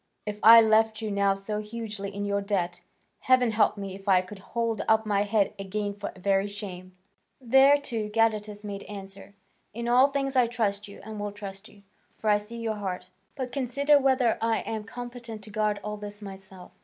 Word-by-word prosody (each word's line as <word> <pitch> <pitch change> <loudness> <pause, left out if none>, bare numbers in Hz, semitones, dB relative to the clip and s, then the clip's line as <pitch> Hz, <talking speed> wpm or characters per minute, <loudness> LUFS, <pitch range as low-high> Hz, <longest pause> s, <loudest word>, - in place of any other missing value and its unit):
If 210 0 -5
I 230 +1 +10
left 220 0 +3
you 215 - -2
now 200 -1 +2
so 210 +2 -4
hugely 210 -2 -6
in 200 +1 -4
your 200 0 0
debt, 180 -3 -2 0.4
heaven 255 -2 +3
help 215 -1 +2
me 195 -1 -5
if 195 +1 -7
I 185 -1 +6
could 190 +2 -11
hold 230 +2 -2
up 220 0 +3
my 205 -2 +1
head 205 -1 +1
again 205 +1 -3
for 200 0 -6
very 195 +1 +1
shame." 185 -3 -8 0.4
Thereto 265 -3 +3
Gadatas 210 -1 0
made 200 -1 -5
answer, 195 0 -10 0.4
"In 235 +1 -4
all 250 +3 +6
things 275 -1 -2
I 250 -2 +4
trust 210 -3 -2
you, 200 - -12
and 215 0 -7
will 205 0 -3
trust 200 0 -9
you, 200 -2 -19 0.3
for 215 - +1
I 205 - +4
see 215 +3 -10
your 225 -2 -3
heart. 185 -2 -5 0.3
But 260 -3 -4
consider 280 +3 +3
whether 260 -3 +2
I 225 0 +1
am 220 -1 -5
competent 240 -2 -8
to 215 - -12
guard 210 -1 0
all 210 0 -4
this 205 0 -8
myself. 190 -2 -11
210 Hz, 195 wpm, -27 LUFS, 200-230 Hz, 0.4 s, I